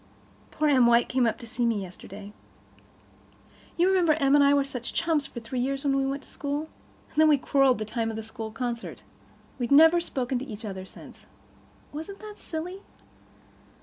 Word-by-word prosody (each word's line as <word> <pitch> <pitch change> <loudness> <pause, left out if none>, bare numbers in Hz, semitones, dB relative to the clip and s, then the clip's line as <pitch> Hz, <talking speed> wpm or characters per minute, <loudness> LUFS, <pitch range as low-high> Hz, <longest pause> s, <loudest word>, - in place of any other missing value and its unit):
Poor 305 - 0
Em 260 -5 +5
White 235 +1 +3
was 255 -1 +3
up 225 - -1
to 235 - -10
see 240 +1 -3
me 230 -3 +1
yesterday. 200 +2 -10 1.4
You 350 +1 +4
remember 365 -4 +4
Em 280 -3 +2
and 290 -1 +6
I 280 - +5
were 285 -1 +4
such 250 -3 -6
chums 320 -4 +1
for 235 - -8
three 240 +3 -4
years 275 +2 -1
when 275 -1 +2
we 270 0 +1
went 275 +1 -3
to - - -19
school? 290 +2 -4 0.4
And - - -23
then 315 0 +6
we 300 -2 +5
quarrelled 270 -1 +3
the 215 - -4
time 225 +1 -2
of 220 - -5
the 220 - -5
school 220 0 -7
concert. 235 0 -5 0.6
We've 240 -2 -2
never 320 +4 +7
spoken 255 -5 -2
to 265 - -6
each 220 -2 -8
other 190 -2 -6
since. - - -14 0.7
Wasn't 320 +7 -7
it 425 -1 -10
silly? 350 +4 -6
270 Hz, 195 wpm, -27 LUFS, 235-300 Hz, 1.4 s, never